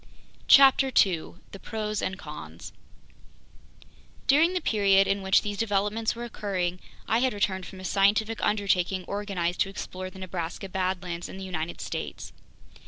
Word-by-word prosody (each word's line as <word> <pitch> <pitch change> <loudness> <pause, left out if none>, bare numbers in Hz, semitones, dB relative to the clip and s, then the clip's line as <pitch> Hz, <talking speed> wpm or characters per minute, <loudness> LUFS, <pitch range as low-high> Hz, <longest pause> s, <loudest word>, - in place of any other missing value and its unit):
CHAPTER 270 -1 +7
2 180 -7 +1
The 195 - -9
Pros 215 -1 -3
and 185 - -3
Cons - - -9 1.5
DURING 315 +6 +4
THE 365 - 0
PERIOD 200 - +3
in 195 0 0
which 190 0 +3
these 205 -1 -4
developments 210 +1 0
were 235 - -6
occurring, 190 -6 -3 0.3
I 225 - +2
had 260 -1 +1
returned 190 -2 -1
from 190 - -11
a 185 - -8
scientific 210 +4 +2
undertaking 190 -3 +1
organized 195 -4 -2
to - - +2
explore 185 -1 -6
the 185 - -14
Nebraska 185 0 -5
badlands 180 -2 -3
in - - -9
the 190 - -7
United 170 -3 -4
States. - - -6
195 Hz, 150 wpm, -27 LUFS, 185-215 Hz, 1.5 s, CHAPTER